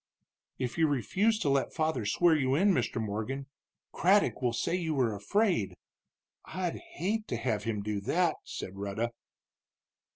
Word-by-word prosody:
"If 125 +3 -3
you 160 - +5
refuse 185 - +1
to 145 - +1
let 135 -1 +1
father 155 -9 0
swear 170 +5 +4
you 135 -3 +2
in, 195 +6 +4
Mr. 125 - 0
Morgan, 110 +6 -3 0.5
Craddock 195 -1 +3
will 125 -2 +2
say 115 - -1
you 165 -4 0
were 125 -5 +2
afraid. 110 - +1 0.7
I'd 180 -2 -3 0.2
hate 215 +5 -1
to - - -2
have 115 -3 -1
him 105 -3 -2
do 105 -1 -2
that," 165 - +1
said 95 +1 -7
Rhetta. 100 +4 -2
135 Hz, 155 wpm, -30 LUFS, 110-175 Hz, 0.7 s, you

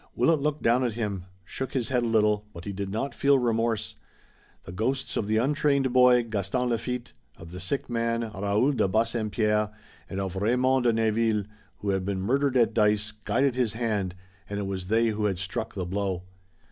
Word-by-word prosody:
Willet 160 -3 +3
looked 150 +1 -1
down 120 +3 +3
at 120 -3 0
him, 105 -5 -3 0.2
shook 130 +8 -5
his 125 -4 -1
head 125 -2 +2
a 120 - 0
little, 105 -2 +2
but 85 - -9
he 100 - -4
did 100 0 -4
not 115 +8 -2
feel 140 0 +4
remorse. 115 -3 0 0.7
The - - -9
ghosts 120 +8 -1
of 100 - -1
the 110 +1 +2
untrained 140 +1 +2
boy, 125 -1 +6
Gaston 110 +3 -1
Lafitte, 120 +1 -3 0.2
of 85 0 -11
the 90 - -7
sick 90 +11 -2
man, 115 -1 0
Raoul 100 +7 +1
de 110 -8 +1
Bassempierre, 105 0 +1 0.4
and 95 - -4
of 95 -1 -3
Raymond 125 +5 +2
de 120 - +4
Neville, 110 -1 +1 0.4
who 105 - -2
had 95 -1 0
been 95 0 -2
murdered 135 +6 +1
at 115 -2 +3
dice, 105 -1 +2
guided 105 +6 0
his 120 -4 0
hand, 105 -6 -1 0.3
and 100 - -3
it 100 - -2
was 95 -2 -4
they 115 +2 +3
who 105 -1 -1
had 95 -3 0
struck 95 +1 -4
the 95 -2 -2
blow. 95 -1 -2
110 Hz, 195 wpm, -27 LUFS, 100-125 Hz, 0.7 s, boy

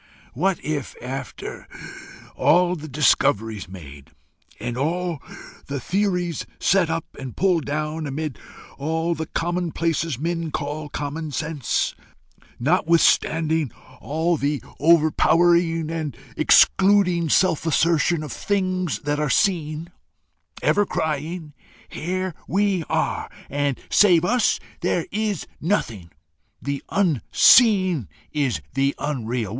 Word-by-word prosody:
what 180 +8 0
if, 150 -4 -3
after 130 +1 -7 0.7
all 180 +1 +3
the 155 -2 -8
discoveries 115 - +1
made, 75 -6 -11 0.5
and 120 +2 -4
all 165 +3 -2 0.5
the 140 0 -3
theories 180 0 -1 0.2
set 185 -3 +3
up 165 -1 -2
and 130 -3 -8
pulled 180 -5 +2
down, 155 +1 -3
amid 145 -2 -4 0.4
all 160 +4 -1
the 160 -1 -5
commonplaces 165 -3 -1
men 165 +2 -2
call 150 0 -4
common 150 +2 -4
sense, 150 -2 -1 0.7
notwithstanding 160 -1 +2 0.3
all 160 +6 0
the 145 0 -1 0.2
over 160 0 +5
powering 165 -2 +3
and 160 -3 -4 0.2
excluding 180 0 +4
self 175 0 +3
assertion 165 0 +2
of 150 - -6
things 185 -4 -1
that 145 0 -1
are 150 -1 0
seen, 165 0 0 0.7
ever 205 - +3
crying, 160 -2 -3 0.4
'Here 185 +2 -3
we 195 -1 +1
are, - - -1 0.2
and 140 -1 -1
save 175 -5 +5
us 245 +3 +2 0.2
there - - 0
is 210 -4 -2 0.2
nothing: 115 - -1 0.5
the 140 +1 -3
Unseen 185 - +4 0.2
is 145 -5 -1
the 140 +1 +1
Unreal! 120 -6 -2
160 Hz, 110 wpm, -23 LUFS, 145-175 Hz, 0.7 s, over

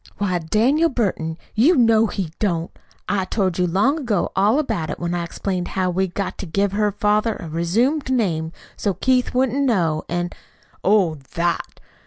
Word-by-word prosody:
"Why, 185 -3 0
Daniel 245 - +2
Burton, 180 - -1 0.2
you 275 +12 +4
know 225 -3 +4
he 185 -6 -4
don't! 170 -5 -1 0.4
I 195 -2 0
told 185 -3 -1
you 180 - +2
long 235 - +2
ago 225 - -1
all 205 +6 +3
about 225 - -1
it, - - -4
when 175 0 -2
I 175 -1 -1
explained 180 +1 -3
how 185 -1 -1
we'd 185 0 -1
got 200 - -3
to 190 - -5
give 200 +4 0
her 210 +1 +1
father 210 +2 +1
a 170 - -8
resumed 225 - 0
name, 165 -10 0 0.2
so 200 -3 -1
Keith 255 -1 +1
wouldn't 260 +2 +2
know, 170 - +1
an' 175 0 -2 0.3
" - - -32
"Oh, 185 -7 +3 0.2
THAT! 170 0 -1
200 Hz, 180 wpm, -21 LUFS, 175-230 Hz, 0.4 s, you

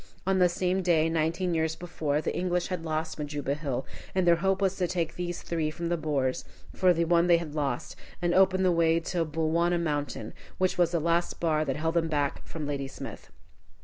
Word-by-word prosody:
On 190 0 +2
the 180 -1 +5
same 180 +2 0
day, 165 -3 +3
nineteen 165 +3 0
years 160 -1 0
before, 155 -4 -2
the - - -2
English 180 -1 0
had 180 -3 -3
lost 160 0 -3
Majuba 145 -1 -2
Hill, 140 -4 -3 0.3
and 185 -1 +2
their 170 -1 +5
hope 190 +2 +1
was 195 -1 +1
to 180 - +1
take 170 -2 -1
these 175 0 -4
three 160 -2 -1
from 170 +2 -4
the 175 - +2
Boers 145 -5 -1 0.3
for 185 -1 +4
the 170 -1 +2
one 170 +1 +3
they 170 -1 +6
had 165 -3 -6
lost, 140 -5 -2 0.2
and 175 -1 +1
open 190 0 +4
the 185 - +4
way 165 -1 +3
to 170 +1 -1
Bulwana 165 +2 +1
Mountain, 145 -3 -3 0.2
which 185 0 +1
was 175 -2 +3
the 170 -1 0
last 170 +2 0
bar 155 -2 +2
that 135 -2 -1
held 160 +2 -1
them 170 -1 +2
back 145 -3 -1
from 155 -2 -5
Ladysmith. 140 -2 -6
165 Hz, 210 wpm, -28 LUFS, 155-175 Hz, 0.3 s, they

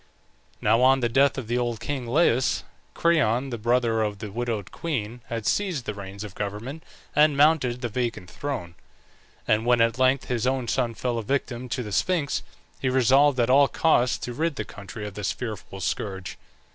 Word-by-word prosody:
Now 110 +3 +3
on 130 +1 +5
the 120 - +1
death 135 +4 +3
of 130 -5 -4
the 120 +2 0
old 120 -2 -2
king 130 0 -4
Laius, 130 -2 +2 0.3
Creon, 135 -6 +2
the 120 - -3
brother 120 0 +2
of 105 -1 -1
the 105 0 -7
widowed 115 -3 -3
queen, 120 -7 -4
had 115 -2 -4
seized 180 - 0
the 105 - -3
reins 100 0 -8
of 105 -3 -8
government 105 +11 -5 0.3
and 150 -1 +5
mounted 140 -5 +3
the 120 - -1
vacant 115 -5 -3
throne; 130 -13 -4 0.7
and 110 +1 +3
when 120 0 +3
at 115 +2 +2
length 130 +1 +3
his 125 -1 -1
own 130 -2 0
son 115 -1 0
fell 120 +1 -1
a - - -4
victim 125 0 -2
to 125 +1 -2
the 105 - -7
Sphinx, 160 - 0 0.4
he 130 - 0
resolved 130 +2 +4
at 120 +1 +3
all 140 +1 +6
costs 125 -6 +2
to 125 - -5
rid 160 +4 -1
the 110 - -4
country 100 +2 -8
of 105 - -6
this 105 -1 -2
fearful 105 -5 -6
scourge. 95 -1 -4
120 Hz, 190 wpm, -25 LUFS, 110-135 Hz, 0.7 s, all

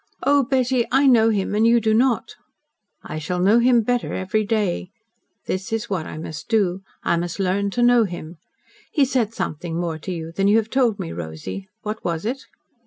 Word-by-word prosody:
Oh, 285 0 +4
Betty, 255 -1 +1
I 270 +2 +4
know 230 -4 +5
him 205 -2 -1
and 215 +2 +3
you 235 0 +5
do 220 -1 +1
not." 245 +1 +1 0.7
"I 155 - -5
shall 180 +4 -3
know 200 +6 +5
him 240 -1 +4
better 245 +2 -1
every 190 +3 0
day. 205 -4 -1 0.6
That 190 +2 -3
is 225 0 -3
what 175 -5 -2
I - - -7
must 155 -1 -7
do. 195 -5 +1 0.2
I 170 - +2
must 175 +1 -3
learn 195 +1 +1
to 240 +4 0
know 240 -1 +5
him. 175 -3 -7 0.5
He 290 -4 +3
said 250 -5 0
something 165 +2 -3
more 165 -2 -3
to 185 - -6
you 165 -2 -5
than 195 +4 0
you 210 +2 +5
have 225 0 -1
told 245 -6 +2
me, 80 - -4
Rosy. 85 +4 -6 0.2
What 215 +1 -5
was 170 +1 -2
it?" 260 +4 -2
205 Hz, 200 wpm, -22 LUFS, 175-235 Hz, 0.7 s, know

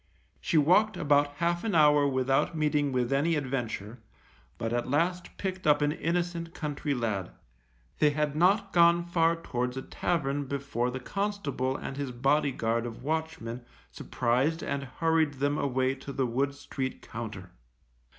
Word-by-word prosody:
She 170 - 0
walked 185 +8 +4
about 145 -1 +2
half 170 +2 0
an 220 -5 -1
hour 150 -2 +5
without 135 +4 +1
meeting 150 -2 +1
with 125 0 0
any 155 +4 +2
adventure, 120 -5 -3 0.6
but 115 +5 -2
at 120 +1 -1
last 175 +6 0
picked 185 -3 -3
up 150 -1 +5
an 145 - +2
innocent 170 +1 -2
country 145 -2 -2
lad. 110 - -2 0.7
They 150 - +5
had 150 0 -1
not 195 +4 +3
gone 170 0 +5
far 170 -1 +2
towards 125 -6 -3
a 130 - -4
tavern 145 -4 -1
before 135 -3 -2
the 130 +1 -4
constable 150 -7 -2
and 135 - -6
his 140 -3 -3
body 135 +4 +2
guard 115 -1 -1
of 120 +1 -9
watchmen 155 -6 -3 0.3
surprised 130 +7 0
and 140 0 -2
hurried 160 +2 +1
them 145 +2 0
away 130 -1 +1
to 135 +1 -8
the 135 -1 0
Wood 135 +4 -1
Street 135 -2 -5
Compter. 110 -6 -7
145 Hz, 155 wpm, -29 LUFS, 130-165 Hz, 0.7 s, hour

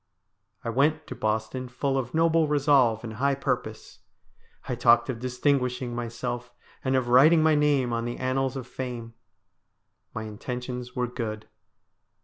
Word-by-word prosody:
I - - -3
went 150 +5 +2
to 130 - -7
Boston 110 +3 -2
full 135 +2 -1
of 130 +1 -2
noble 165 -1 +3
resolve 140 -6 +3
and 110 -2 -6
high 140 +2 +2
purpose. 125 -5 -4 0.7
I - - -1
talked 120 +1 +4
of 115 - -7
distinguishing 125 -1 0
myself, 120 +1 -4 0.3
and 130 0 +1
of 130 -2 0
writing 155 +6 +6
my 160 0 +4
name 145 -5 +2
on 115 0 -1
the 120 0 -4
annals 130 +1 -1
of 130 - -6
fame. 120 -3 -6 1.0
My 110 - -3
intentions 125 +3 -6
were 125 -1 0
good. 115 -3 -5
125 Hz, 145 wpm, -26 LUFS, 120-135 Hz, 1.0 s, writing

